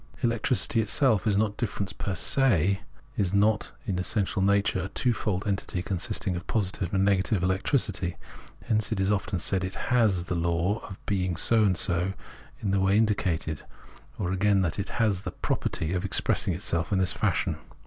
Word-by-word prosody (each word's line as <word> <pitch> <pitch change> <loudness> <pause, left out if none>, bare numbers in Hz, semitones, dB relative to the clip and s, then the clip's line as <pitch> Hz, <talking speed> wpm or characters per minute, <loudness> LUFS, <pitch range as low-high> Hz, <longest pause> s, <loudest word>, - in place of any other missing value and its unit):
Electricity 115 0 +1
itself 110 0 +2
is 100 -2 +2
not 105 -1 0
difference 100 -4 -3
fer 95 - -3
se, 100 - +2 0.4
is 100 -3 +1
not 105 +1 +2
in 90 -2 -1
its 90 - -1
essential 100 -2 0
natui'e 100 -2 +2
a - - -3
twofold 105 -3 -1
entity 95 -3 -2
consisting 95 0 -1
of 90 +2 -6
positive 95 -4 -1
and 95 0 +2
negative 100 -1 +1
electricity; 95 - 0 0.5
hence 110 -1 0
it 110 - -1
is 95 +1 +2
often 100 -2 -1
said 95 +2 0
it 95 +1 -4 0.2
has 105 -8 +3
the 90 - -4
law 85 +4 0
of 95 - -8
being 90 -4 -1
so 115 -2 +4
and 95 -4 +2
so 90 +1 +1 0.5
in 100 - -1
the 100 - +2
way 95 +1 +3
indicated, 90 -8 0 0.6
or 90 -3 -2
again, 100 +1 +2
that 85 +2 -1
it 100 - -3
has 105 -5 +1
the - - -4
property 80 +2 -2
of 90 0 -1
expressing 100 - +1
itself 85 +1 -1
in 100 - +2
this 95 -3 +2
fashion. - - 0
95 Hz, 180 wpm, -27 LUFS, 90-105 Hz, 0.6 s, so